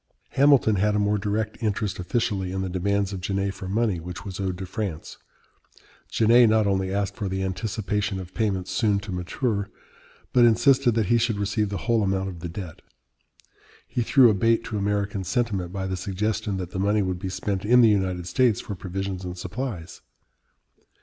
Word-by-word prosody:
Hamilton 135 -6 +4
had 105 +2 +2
a - - +2
more 105 0 +1
direct 105 +2 -2
interest 105 -2 -1
officially 95 -1 -1
in 95 0 -2
the 95 - -3
demands 100 +2 0
of 95 - -5
Genet 100 +1 -1
for 95 -1 -7
money 105 -3 +1
which 90 +5 -8
was 95 -1 -6
owed 95 -2 -2
to 95 - -5
France. 95 -6 -5 0.9
Genet 115 +1 +5
not 110 -1 +3
only 95 -1 0
asked 100 0 -1
for 100 -3 -3
the 95 0 -2
anticipation 100 +1 -2
of 90 -1 -9
payments 95 -5 -1
soon 105 -4 +2
to 105 -1 -7
mature, 100 +4 -2 0.6
but 125 - +5
insisted 125 +2 +4
that 110 -2 +2
he 120 +5 +3
should 115 -2 0
receive 100 +1 0
the 100 - -3
whole 115 -2 +2
amount 95 -1 0
of 90 -3 -8
the 85 0 -5
debt. 85 -2 -8 1.1
He 125 - -2
threw 120 0 +6
a - - +1
bait 115 +3 +2
to 110 - -4
American 100 -1 -1
sentiment 100 -5 -1
by 95 0 -3
the 95 0 -2
suggestion 100 +2 -2
that 90 -1 -5
the 95 - -4
money 105 +2 +2
would 90 -1 -2
be 95 - -4
spent 95 +1 -3
in 125 +4 +5
the 115 - +7
United 95 -4 0
States 110 +4 +2
for - - -6
provisions 95 0 -4
and 90 0 -6
supplies. 105 -4 -5
100 Hz, 190 wpm, -25 LUFS, 95-110 Hz, 1.1 s, the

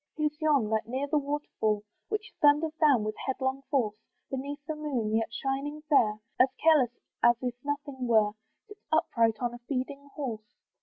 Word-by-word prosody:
Who's 300 -1 0
yon, 285 -9 +3
that, 220 0 0
near 260 +4 -1
the 295 +1 +2
waterfall, 275 -7 -1 0.3
Which 425 -1 -3
thunders 295 +2 +5
down 280 -8 +5
with 215 0 -2
headlong 265 0 -1
force, 225 -7 +1 0.3
Beneath 275 +2 -3
the 315 - -3
moon, 255 -8 -1
yet 225 0 0
shining 275 +4 -3
fair, 215 -8 +4 0.2
As 255 - +6
careless 305 -6 +5 0.3
as 235 0 +6
if 250 -1 -1
nothing 285 -3 -3
were, 215 -3 +4 0.4
Sits 415 -1 -14
upright 230 -8 +3
on 240 -1 0
a 240 - -8
feeding 275 +3 -4
horse? 245 -8 -3
270 Hz, 165 wpm, -29 LUFS, 235-295 Hz, 0.4 s, As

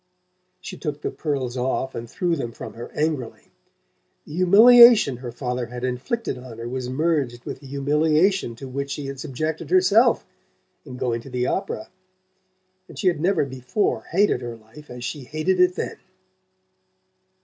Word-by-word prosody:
She 185 - -8
took 150 -2 -5
the - - -2
pearls 135 -5 -3
off 130 +1 -1
and 115 0 -7
threw 175 +6 0
them 120 -6 -4
from - - -8
her 120 +1 -8
angrily. 150 -6 -3 0.7
The - - -11
humiliation 215 - +7
her 125 -1 -7
father 125 -1 -3
had 125 +1 -8
inflicted 130 - -3
on 125 -3 -10
her 115 0 -6
was 125 0 -4
merged 135 -4 -1
with - - -6
the 140 - -13
humiliation 150 - +1
to 135 +3 -9
which 140 +2 -4
she 140 +1 -4
had 135 -1 -6
subjected 155 +4 -4
herself 370 0 +4 0.6
in 130 -3 -9
going 120 -2 -1
to 135 - -12
the 125 -1 -1
opera, 110 -3 -3 1.0
and - - -13
she 185 - +3
had 165 -4 -3
never 185 -3 +2
before 130 - -2
hated 190 -7 +2
her 120 -1 -6
life 115 +7 -16
as 125 0 -8
she 145 0 -5
hated 155 +7 -1
it 180 0 +4
then. - - -4
140 Hz, 165 wpm, -23 LUFS, 125-165 Hz, 1.0 s, humiliation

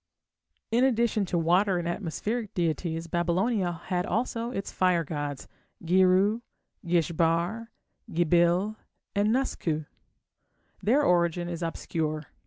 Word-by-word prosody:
In 240 +3 +3
addition 235 -5 +2
to 175 - -1
water 180 +4 +3
and 170 -1 -2
atmospheric 210 +6 -3
deities 165 -1 -1
Babylonia 175 +2 0
had 180 -1 0
also 230 +2 -1
its 200 -5 -4
fire 180 -2 +2
gods, 145 -2 -5 0.4
Girru, 190 +5 +4 0.4
Gish 170 -1 +1
Bar, 170 +8 0 0.4
Gibil, 175 +5 +2 0.4
and 205 +1 +2
Nusku. 170 - -1 1.0
Their 260 +9 +3
origin 175 - +2
is 170 -1 -5
obscure. 160 -2 -2
175 Hz, 110 wpm, -27 LUFS, 170-210 Hz, 1.0 s, Girru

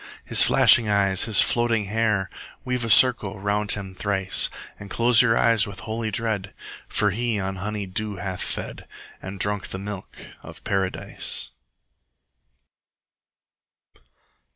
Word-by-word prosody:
His - - +3
flashing 115 -3 +5
eyes, 100 -2 +1
his 110 -4 +6
floating 115 -3 +1
hair! 105 -1 0
50 - - -13 0.2
Weave 125 -2 -2
a - - -4
circle 110 -5 +5
round 105 +1 0
him 95 -2 -7
thrice, 95 -1 +1 0.3
And 100 - -10
close 120 +1 +4
your 115 -2 +2
eyes 115 -2 +3
with 100 -2 -9
holy 110 0 -4
dread, 105 -3 -3 0.3
For 105 -1 0
he 115 +1 -2
on 95 0 -4
honey 105 +1 -4
dew 105 +2 -4
hath 95 0 -5
fed, - - -5 0.3
And 95 +1 -8
drunk 100 0 -1
the - - -6
milk 100 0 -9
of - - -12
Paradise. 95 -2 -3
105 Hz, 135 wpm, -23 LUFS, 95-115 Hz, 0.3 s, his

